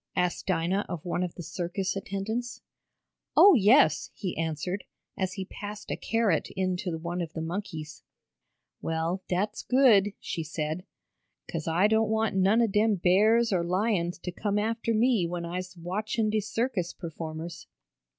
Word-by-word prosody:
asked 180 -2 0
Dinah 185 +2 +1
of 175 -3 -5
one 175 0 -1
of 180 -2 -3
the 175 - -7
circus 180 +3 -3
attendants. 215 +6 -4 0.8
"Oh, 400 - +9
yes," 250 - +5
he 185 -4 -4
answered, 165 +4 -2 0.3
as 190 -1 -2
he 190 -1 -5
passed 205 +2 -7
a - - 0
carrot 225 -8 +1
in 185 -1 0
to 180 -3 -3
one 170 +2 -3
of 165 -1 -5
the 160 - -4
monkeys. 160 -4 -5 0.8
"Well, 165 +3 -1
dat's 205 +4 -1
good," 225 -7 +4
she 170 - -4
said. 155 +3 -3 0.6
"'Cause 165 -2 -4
I 170 +4 +3
doan't 220 0 +2
want 220 -2 +1
none 195 +5 +4
ob 225 - +1
dem 210 +1 +3
bears 210 +5 +4
or 175 -2 +2
lions 180 -1 0
t' 180 +1 -5
come 205 +3 -1
after 225 +2 0
me 225 -5 +3
when 170 0 -4
I'se 180 +1 -5
watchin' 210 +5 -1
de 215 - +2
circus 210 -3 -2
performers." 165 0 -7
190 Hz, 160 wpm, -28 LUFS, 170-215 Hz, 0.8 s, Oh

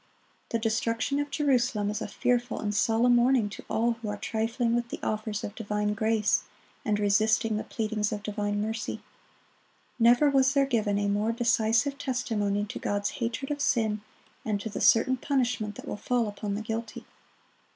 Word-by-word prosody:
The 230 - 0
destruction 230 +4 0
of 290 0 -2
Jerusalem 245 -8 +1
is 210 +1 -4
a - - -3
fearful 245 0 0
and 205 -1 -2
solemn 230 +3 +3
warning 240 -3 +3
to - - -9
all 235 +2 +2
who 230 -2 -5
are 205 - -3
trifling 230 +2 -1
with 240 0 0
the - - -4
offers 215 -1 -2
of 205 - -5
divine 210 -1 -1
grace, 220 -1 +2 0.4
and 210 -6 +1
resisting 215 +2 +2
the 215 - -2
pleadings 215 -2 -2
of 210 -1 -4
divine 205 0 -2
mercy. 220 0 -4 1.0
Never 240 +5 +5
was 265 0 +3
there 275 -1 +4
given 215 -6 0
a 205 0 0
more 205 +2 +1
decisive 235 +3 +1
testimony 210 -6 -1
to 210 - -7
God's 205 0 -1
hatred 240 +4 -2
of 290 0 -2
sin, 220 -6 +1 0.4
and 210 -2 -1
to 220 - -4
the 210 - -5
certain 260 +3 +4
punishment 240 -6 -1
that - - -10
will - - -4
fall 235 +2 0
upon 205 0 -4
the 215 - -4
guilty. 225 0 -5
225 Hz, 175 wpm, -28 LUFS, 210-240 Hz, 1.0 s, Never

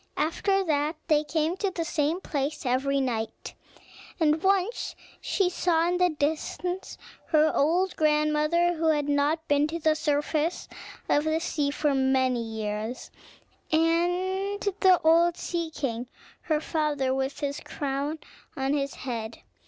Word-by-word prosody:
After 390 +5 +1
that, 305 -1 0
they 305 -1 +4
came 315 +2 0
to 395 0 0
the 340 -3 -3
same 325 +1 0
place 285 -2 -3
every 270 +2 +1
night; 225 -4 -3 0.7
and 310 -1 +3
once 390 +4 0 0.3
she 390 - +1
saw 340 -2 +1
in 355 - +1
the 360 0 +4
distance 320 +4 -3 0.3
her 310 -1 +4
old 355 +6 +2
grandmother, 305 +3 +2
who 325 -1 -1
had 295 -2 +2
not 295 +3 +1
been 290 +1 +3
to 325 +2 -4
the 315 -1 +2
surface 305 +2 -1 0.4
of 295 - +2
the 315 0 +1
sea 295 -3 -1
for 295 0 0
many 265 -2 +2
years, 220 +1 -4 0.6
and 355 +5 +1
the 380 -2 +3
old 335 +2 +4
Sea 340 -2 -3
King, 245 -6 -3 0.4
her 310 -1 +3
father, 300 -4 0
with 265 +2 -2
his 285 0 -2
crown 285 +2 -3 0.4
on 270 +1 0
his 280 -1 -1
head. 230 -3 -5
305 Hz, 140 wpm, -27 LUFS, 280-340 Hz, 0.7 s, they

